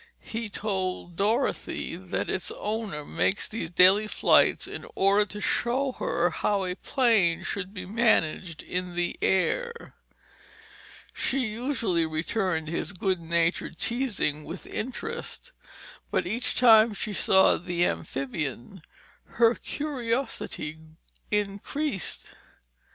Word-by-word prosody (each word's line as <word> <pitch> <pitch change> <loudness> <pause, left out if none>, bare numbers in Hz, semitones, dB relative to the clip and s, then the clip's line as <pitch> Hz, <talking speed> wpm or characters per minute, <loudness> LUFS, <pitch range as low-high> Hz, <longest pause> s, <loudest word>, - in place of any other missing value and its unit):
He 225 -1 -4
told 190 -4 -3
Dorothy 220 +8 0
that - - -3
its - - -1
owner 210 -9 -3
made 195 - +1
these 210 -7 -4
daily 190 +5 +5
flights - - +4
in - - -7
order 200 +2 +4
to 210 - -7
show 255 +5 +1
her 170 +1 +1
how 200 +4 0
a 180 - -2
plane 215 -7 +2
should 195 -1 -3
be 185 -3 -7
managed 185 -6 +1
in 180 -1 -4
the 175 0 0
air. 470 - 0 1.2
She 265 -1 0
usually 220 - 0
returned 160 +1 -1
his 165 +5 -3
good 185 0 0
natured 170 0 0
teasing 220 - 0
with 170 +5 -8
interest, 455 - -5 0.6
but - - 0
each 225 +7 -1
time 225 -3 +6
she 210 - -3
saw 190 0 +5
the 175 0 0
amphibian, 135 - -3 0.5
her 230 0 +5
curiosity 245 - -3 0.5
increased. 210 +4 -2
195 Hz, 110 wpm, -27 LUFS, 175-230 Hz, 1.2 s, time